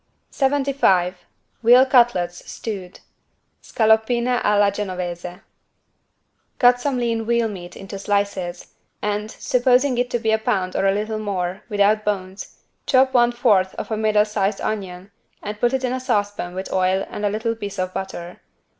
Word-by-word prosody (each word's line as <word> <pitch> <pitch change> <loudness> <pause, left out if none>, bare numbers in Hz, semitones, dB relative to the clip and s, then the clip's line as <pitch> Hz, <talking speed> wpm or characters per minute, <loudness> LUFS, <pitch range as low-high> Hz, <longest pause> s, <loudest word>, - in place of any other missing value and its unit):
75 265 -11 +1 0.3
VEAL 245 +3 +7
CUTLETS 235 -10 +2
STEWED 195 -5 -7 0.6
(Scaloppine 235 +3 +2
alla 205 -1 +3
Genovese) 180 -2 -5 1.2
Cut 245 0 +4
some 275 -1 -1
lean 230 -2 -1
veal 235 -1 +2
meat 180 -4 -8
into 195 0 -8
slices 200 -3 -2 0.3
and, 210 +1 -2
supposing 250 +2 +2
it 245 -1 -1
be 220 - +2
a 220 - +2
pound 185 -4 -1
or 195 - +2
a - - +4
little 215 +2 -2
more, 190 -3 -3
without 210 +1 +2
bones, 195 -2 -4 0.3
chop 260 -1 +4
one 240 -1 +4
fourth 210 -6 +2
of - - -6
a - - +1
middle 215 -1 +2
sized 205 -1 -1
onion 190 -2 -5 0.3
and 210 0 -6
put 240 +1 +2
it 265 -1 -1
in 250 -1 0
a 260 - -2
saucepan 205 -7 -2
with 190 +1 -5
oil 190 +1 +1
and 210 - -7
a 205 - +2
little 220 +3 -1
piece 205 -3 -7
of 185 0 -2
butter. 180 -2 -6
210 Hz, 155 wpm, -21 LUFS, 190-240 Hz, 1.2 s, VEAL